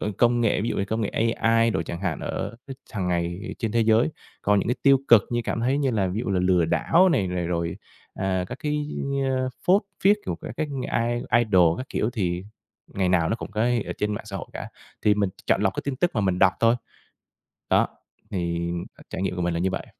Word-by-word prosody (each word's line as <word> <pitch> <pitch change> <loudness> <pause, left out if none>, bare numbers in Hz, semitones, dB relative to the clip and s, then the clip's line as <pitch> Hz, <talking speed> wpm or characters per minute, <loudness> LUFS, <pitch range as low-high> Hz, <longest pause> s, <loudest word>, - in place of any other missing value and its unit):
c 105 -2 -3
công 120 0 +4
nghệ 115 -3 +2
ví 115 - -1
dụ - - -2
như 100 - 0
công 110 +3 -2
nghệ 105 - 0
AI 115 0 +2
đồ - - 0
chẳng 85 - -6
hạn 90 -6 -2
ở - - -4 0.4
hàng 95 -6 -2
ngày 85 +2 -2
trên 115 -3 -2
thế 115 - +2
giới. 110 +3 +4 0.3
Còn 105 0 +3
những - - -1
cái 125 - +2
tiêu 140 -1 +6
cực 115 -4 +8
như 120 0 0
cảm 115 - -2
thấy 130 +4 +1
như 140 -2 +1
là 105 -5 +1
ví 95 +5 -2
dụ - - -2
là 95 -2 +1
lừa 90 -2 +3
đảo 170 - +3
này, 100 - +1
rồi, 85 -2 -2 0.4
à, 95 -1 -1
các - - -6
cái, 150 0 -1 0.4
ơ, 130 0 0 0.2
phốt 190 +3 +5 0.2
phiếc 205 +2 +6
của - - -1
các - - -6
cái 155 - -1 0.4
i 120 0 +1
idol 90 -6 +4
các 130 - -6
kiểu, 110 - -1
thì 90 -6 -2 0.5
ngày 95 -2 +1
nào 85 -3 +3
nó 115 - 0
cũng - - -7
có 105 +1 -3 0.3
ở - - -3
trên 105 0 0
mạng 105 - -6
xã 100 -2 -5
hội - - -6
cả. - - -6 0.3
Thì 105 - +4
mình 100 -2 0 0.2
chọn - - +2
lọc - - +1
cái - - -3
tin 140 -2 -2
tức 175 +4 +1
mà 110 - +1
mình 95 -2 +1
đọc 95 0 +5
thôi. 115 +1 +4 0.9
Đó, - - +4 0.4
thì 85 -2 -2 0.4
trải 95 - -4
nghiệm 95 -2 -1
của 90 - -2
mình 85 -1 0
là 85 - -1
như 95 - +1
vậy. - - -4
105 Hz, 240 wpm, -25 LUFS, 90-120 Hz, 0.9 s, cực